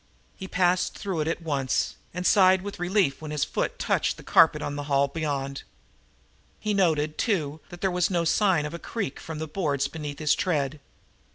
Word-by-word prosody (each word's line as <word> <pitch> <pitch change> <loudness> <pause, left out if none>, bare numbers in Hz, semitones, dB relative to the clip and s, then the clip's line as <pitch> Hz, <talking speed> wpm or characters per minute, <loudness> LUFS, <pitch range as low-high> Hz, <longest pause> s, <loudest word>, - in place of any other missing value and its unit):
He 190 - -7
passed 180 -1 +1
through 190 -5 -3
it 155 - 0
at 165 +1 -2
once 140 -5 0 0.2
and 180 +1 -5
sighed 185 -2 +5
with 205 -2 -6
relief 175 -6 +1
when 155 - -6
his 150 -1 0
foot - - -2
touched - - 0
the - - -12
carpet 160 -2 +5
on 145 - -3
the 145 0 -4
hall 140 0 +3
beyond. 140 -2 -3 1.0
He 215 -1 -1
noted, 155 -6 +1
too, 160 - 0
that 175 -1 -11
there 190 - +1
was 180 -1 +1
no 170 -3 0
sign 175 -3 +3
of 150 - -5
a 170 - -5
creak 200 - -4
from 160 -1 -7
the 160 - -3
boards 145 -5 -1
beneath 145 -1 -6
his 150 -1 +2
tread. 155 -6 -1
160 Hz, 195 wpm, -26 LUFS, 145-185 Hz, 1.0 s, sighed